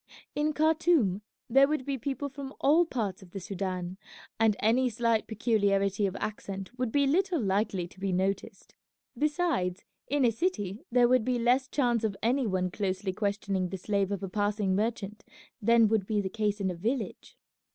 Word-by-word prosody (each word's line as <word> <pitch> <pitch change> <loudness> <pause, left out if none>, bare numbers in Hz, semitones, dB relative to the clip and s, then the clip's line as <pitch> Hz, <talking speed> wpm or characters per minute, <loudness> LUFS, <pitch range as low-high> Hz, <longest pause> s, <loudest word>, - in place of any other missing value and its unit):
In 300 +1 0
Khartoum 310 - +2 0.3
there 270 +3 +5
would 300 -3 -1
be 280 - -1
people 275 +3 -3
from 275 0 -8
all 320 +5 +4
parts 210 - -3
of 190 - -14
the 195 - -6
Soudan, 185 -1 -4 0.4
and 220 -2 +4
any 245 +4 +3
slight 230 -1 0
peculiarity 200 -3 +1
of 190 - -5
accent 195 +1 -5
would 250 -2 -2
be 285 +2 +3
little 350 +4 +2
likely 195 -4 0
to 190 - -18
be 195 0 -1
noticed; 190 +2 -2 0.4
besides, 295 - 0 0.2
in 285 -2 +2
a 235 - +4
city 215 - -2
there 245 0 +5
would 250 -1 +3
be 250 +1 0
less 250 +3 +2
chance 240 -5 +1
of 205 -3 -1
any 250 +2 +2
one 185 -2 0
closely 190 0 -2
questioning 200 -2 -1
the 190 - -4
slave 200 +1 -1
of 200 0 -3
a - - -2
passing 205 0 0
merchant 210 -1 -2 0.4
than 230 +1 +5
would 210 -3 +1
be 215 -2 +1
the 195 -2 -1
case 210 0 -1
in 190 -2 0
a - - -5
village. 225 +7 -3
215 Hz, 180 wpm, -29 LUFS, 195-255 Hz, 0.4 s, there